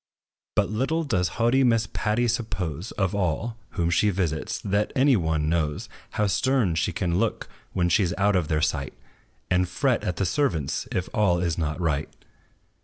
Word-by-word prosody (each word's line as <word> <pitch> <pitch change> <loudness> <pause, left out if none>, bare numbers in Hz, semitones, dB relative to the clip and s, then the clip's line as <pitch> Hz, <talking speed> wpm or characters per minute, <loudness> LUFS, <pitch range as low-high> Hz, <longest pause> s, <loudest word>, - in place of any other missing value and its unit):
But 105 -1 +2
little 135 +9 0
does 90 - +1
haughty 120 +3 +3
Miss 115 -3 +3
Patty 115 +3 +1
suppose, 100 - -2
Of 95 -3 0
all, 100 +4 -1 0.2
whom 85 0 +1
she 105 +4 +3
visits, 85 -5 -1
that 100 +1 0
any 135 0 +5
one 80 -5 0
knows 75 -3 -1 0.2
How 105 - +1
stern 120 -2 +2
she 80 - 0
can 85 -1 -1
look, - - -1 0.3
when 90 -1 +1
she 95 +5 +3
's 90 -1 0
out 100 0 +3
of 90 -4 +1
their 75 0 0
sight, 70 -3 -1 0.6
And 90 0 +2
fret 125 +6 +1
at 90 - -1
the 95 - 0
servants, 85 - 0
if 90 -1 -1
all 100 -7 +3
is 85 -2 0
not 75 0 -2
right. 75 -4 0
90 Hz, 180 wpm, -25 LUFS, 85-115 Hz, 0.6 s, any